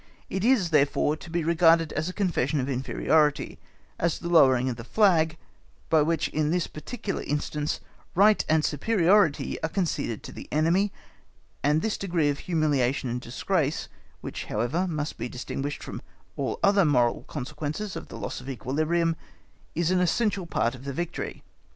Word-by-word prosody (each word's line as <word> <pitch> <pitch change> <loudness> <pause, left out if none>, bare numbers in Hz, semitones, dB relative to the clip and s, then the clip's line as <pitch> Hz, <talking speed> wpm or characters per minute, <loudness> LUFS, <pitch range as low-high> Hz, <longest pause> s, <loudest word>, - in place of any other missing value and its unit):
It 190 - -2
is, 220 -8 +3
therefore, 145 0 +3
to 175 - -11
be 170 0 -1
regarded 165 -1 +4
as 155 +3 -1
a - - -6
confession 165 -8 0
of 130 - -1
inferiority—as 150 +4 -1
the 170 - -5
lowering 130 -7 +5
of 125 - -1
the 115 - -8
flag, 165 - +3 0.5
by 160 -1 +5
which, 160 +1 +1
in 150 -1 0
this 175 0 +1
particular 195 +6 -5
instance, 150 +1 -2 0.4
right 205 +3 +5
and 155 -1 +3
superiority 185 0 +2
are 160 - -1
conceded 155 - -2
to - - -8
the - - -9
enemy, 170 +7 +2 0.7
and 150 +3 +2
this 220 - -1
degree 170 -6 +1
of 145 - -2
humiliation 145 -6 0
and 125 +1 -3
disgrace, 150 +5 -1 0.3
which, - - -6
however, 125 - -1
must 155 -3 -3
be 120 - -3
distinguished 135 +3 -5
from - - -7 0.3
all - - -2
the - - +6
other 200 -1 +5
moral 125 -7 +2
consequences 150 +8 -4
of - - -6
the - - -9
loss - - -5
of 130 - -9
equilibrium, 155 +7 0 0.6
is 170 +2 +1
an 185 - +3
essential 190 +1 +1
part 120 - 0
of 130 0 -11
the 140 0 -4
victory. 175 +4 -4
155 Hz, 165 wpm, -26 LUFS, 140-175 Hz, 0.7 s, the